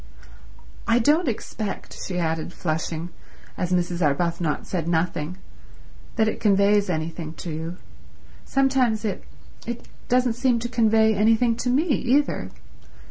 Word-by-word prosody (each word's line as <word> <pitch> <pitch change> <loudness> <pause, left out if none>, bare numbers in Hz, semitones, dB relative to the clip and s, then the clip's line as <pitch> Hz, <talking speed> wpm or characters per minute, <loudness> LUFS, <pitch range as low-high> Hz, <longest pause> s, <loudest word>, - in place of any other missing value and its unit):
"I 230 0 +4
don't 295 +8 +3
expect," 215 -3 -4
she 180 - -3
added, 165 0 -1
flushing, 160 0 -3 0.5
as 180 -1 -2
Mrs. 175 -1 0
Arbuthnot 165 +1 0
said 170 -4 -3
nothing, 170 0 -1 0.8
"that 220 -2 +3
it - - -2
conveys 200 -1 +3
anything 160 -1 -3
to 170 - -6
you. 165 +3 -5 0.7
Sometimes 260 -5 +2
it—it 235 +3 -7 0.2
doesn't 250 -1 +3
seem 245 0 +2
to 235 +1 -3
convey 220 -2 +4
anything 225 +3 +3
to 245 +1 -1
me 265 +5 +3
either. 275 - +1
205 Hz, 125 wpm, -24 LUFS, 170-240 Hz, 0.8 s, I